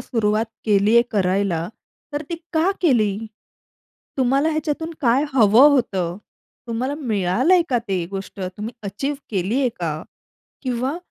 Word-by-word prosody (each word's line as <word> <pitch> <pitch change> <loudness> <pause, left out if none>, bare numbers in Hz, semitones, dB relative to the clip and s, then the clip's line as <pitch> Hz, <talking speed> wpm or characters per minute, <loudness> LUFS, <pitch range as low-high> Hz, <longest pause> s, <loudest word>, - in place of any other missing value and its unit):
सुरुवात 220 -1 0 0.2
केलीये 215 +2 +4
करायला 185 -4 0 0.4
तर 290 - -2
ती 340 - -2 0.2
का 325 +3 +3
केली? 225 - +3 1.0
तुम्हाला 270 +4 +2
ह्याच्यातून 310 +1 -2
काय 255 +2 +3
हवं 235 +2 +7
होतं? 190 -11 0 0.5
तुम्हाला 250 +5 -2
मिळालंय 240 - +2
का 245 - +2
ते 185 -3 0
गोष्ट? 195 0 -7 0.2
तुम्ही 215 +3 -5
अचीव्ह 240 +9 -3
केली 205 +5 0
आहे 260 - +3
का? 155 -2 -2 0.6
किंवा 255 +3 -1
230 Hz, 125 wpm, -21 LUFS, 200-275 Hz, 1.0 s, हवं